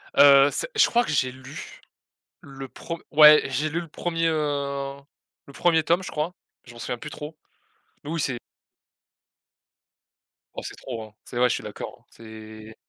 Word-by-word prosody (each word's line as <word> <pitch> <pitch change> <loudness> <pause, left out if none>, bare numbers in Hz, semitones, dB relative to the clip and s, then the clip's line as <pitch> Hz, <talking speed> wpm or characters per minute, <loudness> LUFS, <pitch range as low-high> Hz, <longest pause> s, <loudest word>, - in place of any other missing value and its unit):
Heu, 140 0 +8
c'est - - -2
je 435 - +6
crois 240 0 +3
que 220 - -4
j'ai 130 -3 +1
lu, 130 +4 -10 0.6
le 135 -1 -9
prem 170 +6 -7
ouais, 150 0 +9
j'ai 145 +3 -1
lu 165 +3 -2
le 170 - -9
1er, 165 +1 -2
heu, 140 -3 -2 0.5
le 140 - -13
1er 165 +1 +3
tome, 170 +4 +2
je - - -6
crois. 155 +3 -2 0.3
Je 120 - -13
m'en 120 - -13
souviens 120 - -4
plus 150 - -8
trop, 150 +2 -8 0.7
mais 145 - -8
oui, 165 - -2
c'est 135 -5 -1 2.2
oh, - - -6
c'est - - -7
trop, 120 -4 -7
hein. 110 -1 -13
C'est - - -7
vrai, 125 0 +4
je - - +1
suis - - -6
d'accord, - - -8
c'est 110 -1 -12
145 Hz, 175 wpm, -25 LUFS, 130-160 Hz, 2.2 s, ouais